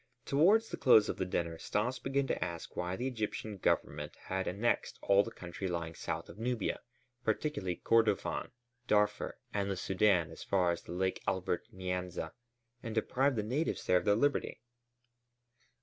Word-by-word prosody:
Towards 195 +11 +4
the - - -4
close 110 -5 +6
of - - -2
the 95 - -1
dinner 85 -2 -2
Stas 120 +8 -1
began 135 +1 0
to - - -1
ask 85 -1 -6
why 90 +1 -2
the 125 - -3
Egyptian 110 -3 -3
Government - - 0
had 95 0 -2
annexed 105 +6 0
all 100 0 +5
the - - -6
country 90 +2 -6
lying 85 -2 -3
south - - -4
of - - -12
Nubia, 120 -2 -1 0.4
particularly 110 - -1
Kordofân, 115 -1 +2 0.4
Darfur, 105 0 +2 0.2
and 100 -1 0
the 100 - 0
Sudân 95 -3 +2
as - - -9
far 90 -3 +2
as 85 - -5
Lake 95 +1 -1
Albert 90 -1 -1
Nyanza 90 -3 -3 0.5
and 115 -2 -5
deprived 130 +4 +2
the 105 - 0
natives 135 +10 -1
there 90 - +5
of 90 - -1
their 105 - +5
liberty. 145 +6 +1
100 Hz, 165 wpm, -33 LUFS, 90-120 Hz, 0.5 s, close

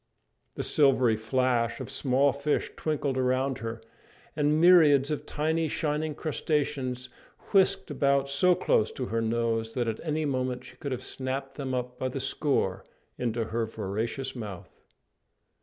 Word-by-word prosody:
The - - -3
silvery 130 -6 +4
flash 120 +1 0
of - - -6
small 135 +1 +2
fish 140 +1 -1
twinkled 145 -4 -1
around 130 +1 +1
her, 115 0 -5 0.6
and 150 0 +2
myriads 155 -5 +6
of 150 - -3
tiny 160 +2 0
shining 150 0 -2
crustaceans 140 -5 -2 0.4
whisked 195 -3 +3
about 140 -1 +2
so 175 +6 +3
close 110 -9 +2
to 130 - -4
her 115 - +1
nose 115 0 -1
that 120 -2 0
at 110 -1 -2
any 155 -1 -1
moment 130 -2 -2
she - - -13
could 140 - -5
have 130 0 -3
snapped 135 +1 -4
them 135 -2 -3
up 125 0 -4
by 130 - -1
the 130 +2 -4
score 100 -10 0 0.4
into 115 -1 -1
her 115 +1 -2
voracious 115 +6 -3
mouth. 105 -7 -8
130 Hz, 150 wpm, -28 LUFS, 120-145 Hz, 0.6 s, myriads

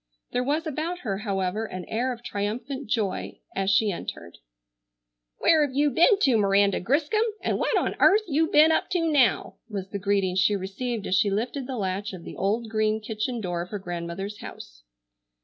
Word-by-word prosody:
There 250 - 0
was 300 +5 0
about 320 +4 -3
her, 195 -5 -3
however, 200 0 -1
an 185 -4 -6
air 245 +4 -1
of 240 -1 -8
triumphant 245 +7 -4
joy 215 -5 -1 0.2
as 195 0 0
she 205 +1 +3
entered. 85 - -7 1.0
"Where 315 -2 +4
have 270 -3 -3
you 290 +1 +3
ben 345 - +5
to, 250 - +4
Miranda 200 -1 +3
Griscom, 295 - +1 0.2
and - - -1
what - - +1
on - - 0
airth 425 +2 +6
you 320 +1 +2
ben 310 +2 +6
up - - +1
to 360 - +2
now?" 265 -6 +2
was 195 -3 -5
the 200 - -3
greeting 195 -1 +1
she 190 +2 +3
received 205 +4 -4
as - - -2
she 200 +2 +3
lifted 245 +6 -2
the 260 -2 -4
latch 195 +1 -2
of 180 -3 -8
the - - -8
old 220 +4 -1
green 215 0 +1
kitchen 220 +2 -3
door 175 -3 -2
of 175 - -7
her 210 - -4
grandmother's 175 +2 -5
house. - - -10
215 Hz, 190 wpm, -26 LUFS, 195-265 Hz, 1.0 s, airth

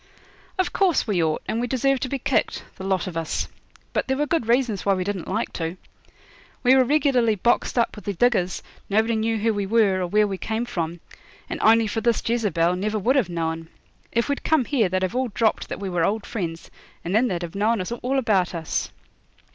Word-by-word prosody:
'Of 370 -1 0
course 370 -6 +2
we 195 -7 +1
ought, 155 -1 -1
and 230 - -1
we 245 - -1
deserve 270 +2 +1
to 260 - -3
be 275 - -1
kicked 255 - 0
the 190 - -7
lot 190 -1 0
of 185 -3 -6
us; 165 -1 -2 0.5
but - - 0
there 265 0 0
were 295 - +1
good 290 -5 0
reasons 235 -5 +1
why 200 -1 +3
we 185 - -1
didn't 195 -2 -4
like 215 +5 -2
to. 165 +2 -3 0.9
We 250 +1 +6
were 260 - +6
regularly 255 -5 +2
boxed 235 +5 +1
up 235 - +2
with 210 - -11
the 200 -2 -2
diggers, 190 -4 +1 0.3
nobody 220 +3 +2
knew 225 +1 0
who 225 +1 +1
we 200 -1 -2
were, 200 -3 +3
or 180 - -1
where 210 +4 +3
we 195 -2 -4
came 225 +2 -2
from, 170 -6 -4 0.5
and - - -3
only 225 +1 +5
for 220 +1 -2
this 235 0 +1
Jezebel 185 -7 +1
never 210 +3 -1
would 240 +7 +2
have 245 -10 +2
known. 165 -1 -3 0.4
If 235 0 +1
we'd 285 -1 -2
come 315 -6 +2
here 230 -9 +1
they'd 185 +1 0
have 185 - -1
all 260 0 +1
dropped 220 0 0
that - - -5
we 200 - -4
were 175 -3 0
old 210 +4 0
friends, 170 -7 -5 0.3
and 175 - -2
then 230 +4 +4
they'd 175 -4 -2
have 170 - -6
known 215 +3 +1 0.2
all 265 +2 0
about 200 -9 +1
us.' 160 -2 -2
215 Hz, 220 wpm, -24 LUFS, 185-240 Hz, 0.9 s, We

